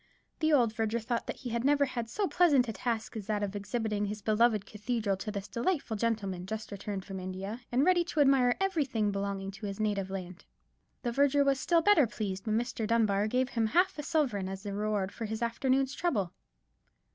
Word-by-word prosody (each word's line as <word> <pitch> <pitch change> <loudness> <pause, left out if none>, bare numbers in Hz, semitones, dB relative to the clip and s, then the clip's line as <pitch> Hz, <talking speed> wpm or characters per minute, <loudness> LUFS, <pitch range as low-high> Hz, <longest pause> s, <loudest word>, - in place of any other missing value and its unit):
The 315 -1 +2
old 240 -7 +4
verger 225 +1 0
thought 235 +1 -2
that - - -3
he 250 -4 -7
had 235 0 -1
never 285 +1 +4
had 235 -4 -4
so 415 - -1
pleasant 290 -10 +4
a 225 - -3
task 225 0 -3
as 215 -2 -6
that 210 -1 0
of 205 0 -3
exhibiting 210 0 -2
his 205 0 -5
beloved 215 -1 +3
cathedral 210 0 -2
to 200 +3 -5
this 200 -1 -4
delightful 260 -2 -1
gentleman, 200 -5 -2
just 220 +2 -5
returned 200 -1 -5
from 195 -1 -6
India, 190 +5 -5
and 255 +4 +3
ready 360 -1 +4
to 335 - -3
admire 270 -3 +5
everything 280 - 0
belonging 195 -1 -3
to 200 +1 -7
his 200 +1 -5
native 205 -3 0
land. 185 -2 -6 0.6
The 240 - 0
verger 280 +2 +3
was 275 -1 +2
still 335 +4 +2
better 325 -10 +5
pleased 195 -3 -4
when 215 0 +2
Mr. 235 -2 -2
Dunbar 215 -3 +2
gave 255 +3 +1
him 230 -4 0
half 355 - +2
a - - 0
sovereign 275 - 0
as 190 0 -6
the 200 -2 -4
reward 205 -1 -1
for 225 - -5
his 220 +2 -3
afternoon's 265 +3 +1
trouble. 220 - -1
225 Hz, 205 wpm, -30 LUFS, 200-260 Hz, 0.6 s, admire